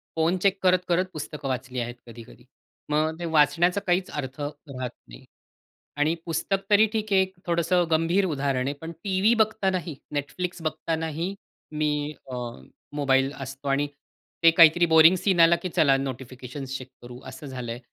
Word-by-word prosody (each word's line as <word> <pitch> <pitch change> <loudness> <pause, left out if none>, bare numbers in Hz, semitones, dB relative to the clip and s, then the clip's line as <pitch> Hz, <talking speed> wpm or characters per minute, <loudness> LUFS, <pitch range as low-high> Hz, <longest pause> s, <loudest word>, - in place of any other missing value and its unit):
Phone 165 +3 +2
check 195 -1 +2
करत 185 0 +5
करत 175 +2 +2
पुस्तकं 150 -1 -6
वाचली 130 -1 -3
आहेत 120 0 -4
कधी-कधी. 120 +1 -13 0.4
मग 155 +2 0
ते 175 - -4
वाचण्याचा 170 +4 +3
काहीच 180 +1 +1
अर्थ 130 -1 -5
राहत 145 -3 -6 0.2
नाही - - -13 0.7
आणि 150 +3 +2
पुस्तक 170 +4 -1
तरी 210 +1 +6
ठीक 215 -1 -2
आहे 190 - +6
एक 190 0 -2
थोडंसं 170 +1 +2
गंभीर 165 +5 +2
उदाहरण 135 -5 -1
आहे. 140 - -1
पण 165 +1 -6
टीव्ही 195 +3 +2
बघतानाही 190 -7 -2 0.2
Netflix 175 +5 -4
बघतानाही 160 +2 -2 0.4
मी 150 -1 -1 0.2
अ, - - -4 0.6
मोबाईल 135 -2 +2
असतो 135 +1 -7
आणि 140 +1 +1 0.6
ते 165 - +8
काहीतरी 165 +1 +6
बोरिंग 160 +2 +7
सीन 185 0 +1
आला 165 +1 +7
की 185 - -3
चला 140 -3 +5
नोटिफिकेशन्स 130 0 -6
चेक 130 - -10
करू 120 0 -10
असं 150 - -9
झालं 125 -3 -5
आहे. 120 - -6
155 Hz, 160 wpm, -25 LUFS, 135-175 Hz, 0.7 s, ते